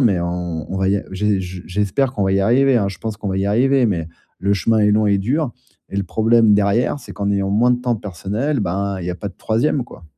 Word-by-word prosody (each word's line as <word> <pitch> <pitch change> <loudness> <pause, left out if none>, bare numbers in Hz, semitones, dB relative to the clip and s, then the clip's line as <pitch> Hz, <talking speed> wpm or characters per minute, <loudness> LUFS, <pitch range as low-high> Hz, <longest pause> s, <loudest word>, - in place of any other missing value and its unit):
mais 100 -8 +3
on 85 -2 -3
on - - -2
va 95 0 +1
y 100 - +3
a - - -3
j'ai 105 +1 +1
j'espère 95 +7 -2
qu'on 105 - -2
va 95 - +1
y 95 - +2
arriver 125 +6 +3
hein, 100 -4 +1
je 95 -3 -8
pense 110 +1 -4
qu'on 105 -1 -5
va 95 - -2
y 95 - 0
arriver, 130 +5 +3
mais 85 -5 -2 0.3
le 100 +1 +1
chemin 110 +4 +1
est 105 0 +4
long 105 0 +3
et 100 -1 +3
dur. 130 +6 -1 0.4
Et 100 - -5
le 100 - +1
problème 110 +2 +3
derrière, 105 +7 +1
c'est - - -10
qu'en 100 -1 -2
ayant 100 -1 0
moins 115 +5 +3
de 125 - -1
temps 120 -2 0
personnel, 105 - -3
ben 100 +1 -2
il 85 - -5
y 90 - -1
a - - -3
pas 100 - -5
de 90 - -14
3e, 130 +5 0
quoi. 85 - -14
100 Hz, 265 wpm, -19 LUFS, 95-115 Hz, 0.4 s, est